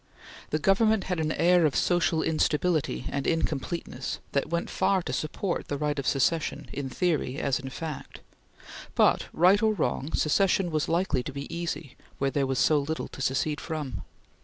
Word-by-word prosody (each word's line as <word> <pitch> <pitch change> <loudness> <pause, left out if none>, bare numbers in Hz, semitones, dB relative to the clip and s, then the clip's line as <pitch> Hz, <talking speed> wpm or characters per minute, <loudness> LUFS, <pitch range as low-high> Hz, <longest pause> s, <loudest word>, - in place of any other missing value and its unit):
The 155 - +1
Government 200 +5 +3
had 180 -3 -2
an 155 -1 0
air 175 0 +4
of 150 -3 +2
social 175 -2 +2
instability 155 0 +1
and 140 -1 -2
incompleteness 160 -3 -2
that 140 - 0
went 170 0 -1
far 190 -1 +2
to - - -4
support 175 +4 -2
the 145 - -2
right 150 0 -1
of 135 - -3
secession 140 +6 0
in 140 -2 -4
theory 150 -4 0
as 140 -4 0
in 135 0 -6
fact; 155 +2 -7 0.7
but - - +3
right 185 +5 +4
or 220 -1 +3
wrong, 145 -2 -1
secession 180 +3 +2
was 155 -1 0
likely 170 -6 +1
to 145 - -6
be 140 +3 -6
easy 165 -5 -4 0.2
where 135 0 0
there 140 -1 0
was 135 -1 -1
so 150 +3 +4
little 155 +3 -3
to - - -9
secede 135 +4 0
from. 145 - -4
155 Hz, 175 wpm, -27 LUFS, 140-175 Hz, 0.7 s, air